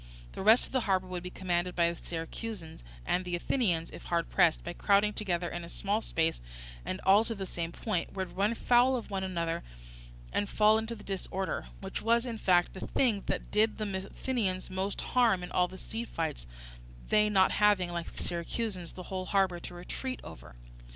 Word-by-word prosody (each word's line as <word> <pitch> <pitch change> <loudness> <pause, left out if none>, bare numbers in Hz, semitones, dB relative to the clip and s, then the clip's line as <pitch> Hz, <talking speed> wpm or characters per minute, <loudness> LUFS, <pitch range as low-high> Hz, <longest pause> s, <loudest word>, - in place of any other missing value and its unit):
The - - -6
rest 220 +5 +6
of - - -13
the 260 - +2
harbour 190 -1 +3
would 180 -1 -4
be 180 - -6
commanded 180 -1 -1
by 170 -1 +3
the 170 - -10
Syracusans; 165 - -6 0.2
and 180 - +1
the 180 -1 -2
Athenians, 175 -4 0
if - - -10
hard 170 -1 0
pressed, 160 - +4
by 175 - -4
crowding 205 +3 +3
together 180 -5 -1
in 175 0 -5
a 170 - -8
small 205 +4 -1
space 165 - 0 0.4
and 185 - -3
all 200 +3 +6
to 230 0 -4
the 195 -2 -4
same 170 -2 -3
point, 195 -2 -2
would 190 -2 -4
run 205 +4 +2
foul 245 +3 +4
of 235 -4 -5
one 190 -1 -1
another 170 -3 -1 0.7
and 205 - 0
fall 215 +1 +5
into 225 +1 -4
disorder, 195 -2 -3
which 195 0 -4
was, 235 +2 +3
in 230 -3 -4
fact, 175 -3 +3
the 190 - -6
thing 225 -7 +2
that - - -2
did 215 +1 +3
the 195 -3 -3
Athenians 200 -9 -2
most 190 +2 -2
harm 225 -8 +3
in 180 - -7
all 180 0 +3
the 190 - -10
sea 225 +4 -5
fights, 160 - -4 0.6
they 210 0 +4
not 190 -2 +4
having, 205 -4 +3
like 170 -1 -4
the - - -6
Syracusans, 180 +1 -3
the 185 - -8
whole 185 0 -4
harbour 190 -3 +2
to 175 - -8
retreat 255 +9 -5
over. - - -11
190 Hz, 200 wpm, -31 LUFS, 175-215 Hz, 0.7 s, rest